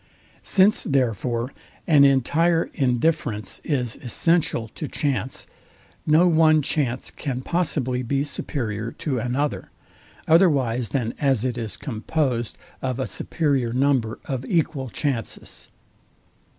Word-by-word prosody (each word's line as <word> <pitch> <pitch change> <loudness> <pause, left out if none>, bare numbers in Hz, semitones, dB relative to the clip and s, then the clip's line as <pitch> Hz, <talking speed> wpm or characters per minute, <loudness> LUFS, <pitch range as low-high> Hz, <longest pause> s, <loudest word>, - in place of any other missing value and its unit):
Since 200 +2 +4
therefore 125 - 0 0.3
an 145 -4 +6
entire 165 +5 +2
indifference 125 -4 0
is 125 -7 -2
essential 135 -2 0
to 150 - -6
chance, 135 -3 -2 0.6
no 160 +4 +5
one 155 -2 +4
chance 135 -4 -1
can 130 -3 -4
possibly 130 -6 -1
be 135 +3 0
superior 115 -6 -4
to 135 -6 -2
another, 130 +5 -2 0.6
otherwise 135 - +3
than 120 -3 -1
as 135 -5 +2
it 125 -2 -1
is 115 -3 -5
composed 125 -1 -2 0.2
of 130 -1 -2
a 130 - 0
superior 140 -7 -1
number 130 -4 +1
of 130 -2 -3
equal 145 -4 0
chances. 125 -4 -4
135 Hz, 110 wpm, -23 LUFS, 120-150 Hz, 0.6 s, an